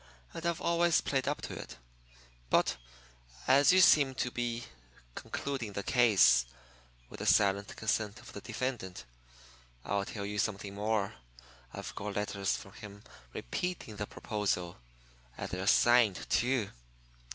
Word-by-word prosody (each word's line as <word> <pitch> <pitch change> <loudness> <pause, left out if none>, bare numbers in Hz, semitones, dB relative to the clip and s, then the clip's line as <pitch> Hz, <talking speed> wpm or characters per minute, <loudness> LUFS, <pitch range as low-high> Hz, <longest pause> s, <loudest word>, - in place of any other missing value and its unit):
And 165 - -7
I've 170 -1 -1
always 170 -1 +3
played 135 -1 -1
up 145 - -2
to - - -5
it. - - -8 0.7
But - - +3 0.7
as 140 +4 +6
you 185 +1 +6
seem 140 -6 +6
to 125 -1 -1
be 120 -1 -3 0.5
conducting 130 - -4
the 100 - -3
case 100 - +5 0.6
with - - -11
the - - -3
silent 100 0 +3
consent 110 -1 -1
of - - -13
the 100 - -7
defendant 115 - -4 0.8
I'll 100 0 0
tell 100 -1 -5
you 105 +1 -3
something 100 -2 -2
more. 105 0 -1 0.6
I've - - -7
got 100 +1 -5
letters 100 -1 -1
from 100 - -12
him 100 0 -11 0.3
repeating 115 - -4
the 105 - -3
proposal. 95 - -2 0.6
And - - -5
they're 95 +1 -3
signed, 120 -3 +4
too." 120 -3 +1
105 Hz, 140 wpm, -31 LUFS, 100-130 Hz, 0.8 s, as